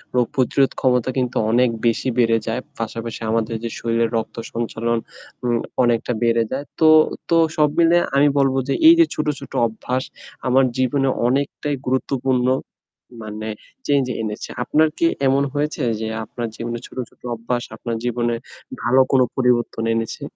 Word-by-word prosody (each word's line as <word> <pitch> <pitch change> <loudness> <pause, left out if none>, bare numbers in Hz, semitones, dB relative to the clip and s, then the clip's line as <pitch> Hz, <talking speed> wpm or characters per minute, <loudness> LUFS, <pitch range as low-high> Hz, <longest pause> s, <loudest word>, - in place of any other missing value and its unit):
রোগ-প্রতিরোধ 130 +2 +2
ক্ষমতা 125 -1 +2
কিন্তু 125 -1 -1
অনেক 125 +1 +4 0.2
বেশি 115 +3 +1
বেড়ে 115 -1 +4
যায়। 115 +3 -1 0.2
পাশাপাশি 115 0 -5
আমাদের 115 0 0
যে 115 - -2
শরীরের 115 0 0
রক্ত 110 - -4 0.2
সঞ্চালন 115 0 -1 0.5
উম 120 -1 +1 0.2
অনেকটা 120 0 +1
বেড়ে 115 0 +3
যায়। 140 +2 -3
তো 160 - +5 0.4
তো 165 - +4 0.2
সব 150 -1 +4
মিলে 170 +1 +5 0.2
আমি 145 +1 +5
বলবো 135 -1 +2
যে - - +1
এই 335 - +10
যে 335 - +8
ছোট, 155 - -2
ছোট 140 - -11 0.2
অভ্যাস 125 +3 -3 0.4
আমার 130 +1 +4
জীবনে 135 +1 +1 0.2
অনেকটাই 140 +2 -1
গুরুত্বপূর্ণ 130 -1 0 0.7
মানে 110 0 -6 0.4
চেঞ্জ 140 -2 +3 0.2
এনেছে। 105 -1 -5
আপনার 155 +5 +3
কি - - +2 0.2
এমন 135 +1 +3
হয়েছে 150 +1 -2 0.2
যে 110 - -2 0.2
আপনার 120 0 -5
জীবনে 120 0 -4
ছোট, - - -16
ছোট - - -29
অভ্যাস 120 +2 -2
আপনার 115 +1 -4
জীবনে 120 -1 0 0.5
ভালো 130 +2 +5
কোন 135 - +5
পরিবর্তন 125 -3 +1
এনেছে? 115 0 -3
125 Hz, 155 wpm, -21 LUFS, 115-135 Hz, 0.7 s, এই